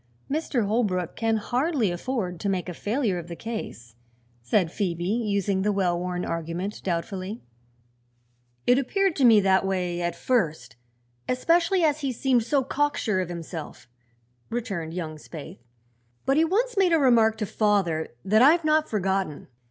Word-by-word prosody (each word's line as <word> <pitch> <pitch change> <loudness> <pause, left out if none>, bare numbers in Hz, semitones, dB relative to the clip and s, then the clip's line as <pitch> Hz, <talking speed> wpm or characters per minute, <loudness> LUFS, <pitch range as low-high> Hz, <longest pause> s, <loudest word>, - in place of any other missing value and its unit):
"Mr. 280 -6 0
Holbrook 200 -5 0
can 225 -1 +1
hardly 250 - 0
afford 180 -2 -3
to 200 - -1
make 185 -2 -1
a 180 - -4
failure 210 - -1
of 170 - -9
the 170 - -6
case," 190 - -7 0.5
said 165 - +1
Phoebe, 175 -4 -2
using 200 -2 0
the 210 +2 +1
well 190 -3 +1
worn 180 0 -3
argument 170 +5 -4
doubtfully. 185 +4 -4 1.2
"It 245 +2 +5
appeared 385 +6 +1
to 275 - +1
me 225 -3 +7
that 190 0 +3
way, 180 -2 -1
at 175 -1 -1
first, 160 - -1 0.5
especially 335 +8 +2
as 305 -1 +2
he 275 -3 -1
seemed 250 0 +2
so 265 +4 +1
cocksure 270 -7 0
of 180 - -4
himself," 165 -5 -7 0.6
returned 190 -9 -4
young 160 -3 -4
Spaythe. 160 +3 -10 0.7
"But 270 +2 +2
he 320 - +5
once 465 +8 0
made 380 -4 +3
a - - +6
remark 230 -5 +4
to 215 - -2
father 195 -7 +1 0.2
that 215 +3 +4
I've 315 +5 +5
not 310 0 +2
forgotten. 190 -8 -2
205 Hz, 155 wpm, -25 LUFS, 175-255 Hz, 1.2 s, me